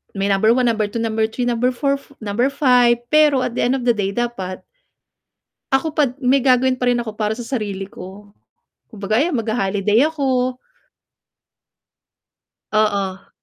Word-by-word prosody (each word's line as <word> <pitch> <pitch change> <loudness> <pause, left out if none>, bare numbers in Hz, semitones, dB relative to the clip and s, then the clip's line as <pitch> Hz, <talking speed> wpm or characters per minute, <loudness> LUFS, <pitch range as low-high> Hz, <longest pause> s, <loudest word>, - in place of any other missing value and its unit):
may 195 0 -1
number 220 +4 +3
1, 255 - +2
number 215 -2 +1
2, 230 +3 -5
number 220 -1 0
3, 235 +3 -4
number 245 +1 +1
4, 275 +1 0 0.2
number 220 +5 0
5, 245 -4 +3
pero 300 -4 +4
at 235 - -3
the - - -1
end 250 +2 +1
of 260 - -4
the 240 - +3
day 200 -2 -2
dapat 215 -7 -4 1.1
ako 270 +4 +1
pa 305 -1 +2
d 255 - -15
may 265 +1 +4
gagawin 255 0 +3
pa 250 - +2
rin 245 - +2
ako 220 -3 -6
para 215 +1 -2
sa 240 - -6
sarili 205 -6 -4
ko. 200 +2 -12 0.6
Kumbaga 215 +2 -1
ayan 305 -4 0
magha-holiday 210 -1 +1
ako. 255 -4 -1 2.1
Oo. 200 -3 -1
235 Hz, 160 wpm, -19 LUFS, 210-255 Hz, 2.1 s, pero